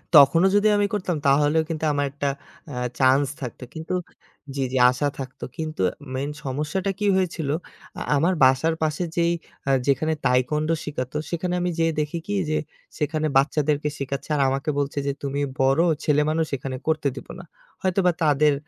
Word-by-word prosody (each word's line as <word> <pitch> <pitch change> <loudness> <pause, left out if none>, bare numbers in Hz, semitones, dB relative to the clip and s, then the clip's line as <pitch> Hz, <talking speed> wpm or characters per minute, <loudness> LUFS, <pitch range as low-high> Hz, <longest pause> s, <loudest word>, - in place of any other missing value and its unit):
তখনও 150 +6 +7
যদি 205 +1 +4
আমি 205 - +3
করতাম 185 -4 -1
তাহলেও 145 +3 +4
কিন্তু 160 -1 -4
আমার 145 0 +1
একটা 145 0 -2 0.4
আ - - -5 0.2
চান্স 135 +2 +4
থাকতো 125 0 -6
কিন্তু 160 +3 -5 0.6
জি, 135 - 0
জি 130 - 0
আশা 145 +3 -1
থাকতো 130 -1 -7
কিন্তু 155 -7 -4 0.3
মেইন 140 +2 -2 0.2
সমস্যাটা 155 +9 -1
কি 205 - +1
হয়েছিল, 170 -6 -1 0.5
আ - - -6 0.2
আমার 170 +6 +2
বাসার 135 +5 +4
পাশে 155 +3 0
যেই 170 0 +3 0.4
আ - - +4 0.2
যেখানে 155 +4 +2
Taekwondo 150 +6 +2
শেখাতো 130 -4 -4 0.2
সেখানে 175 +1 -2
আমি 180 0 0
যেয়ে 165 -1 +2
দেখি 150 +3 -1
কি 205 - -2 0.2
যে 155 - +1 0.4
সেখানে 155 +1 0
বাচ্চাদেরকে 150 +1 +1
শেখাচ্ছে 140 +2 -4
আর 140 - +1
আমাকে 135 +3 -2
বলছে, 140 0 -2
যে - - +2
তুমি 140 0 -2 0.2
বড়, 135 +3 +3 0.3
ছেলেমানুষ 155 +2 +2
এখানে 130 0 -5
করতে 155 -3 +1
দিব - - -9
না। 175 - -9 0.4
হয়তোবা 185 -1 +2
তাদের 150 0 +4
150 Hz, 165 wpm, -24 LUFS, 140-165 Hz, 0.6 s, তখনও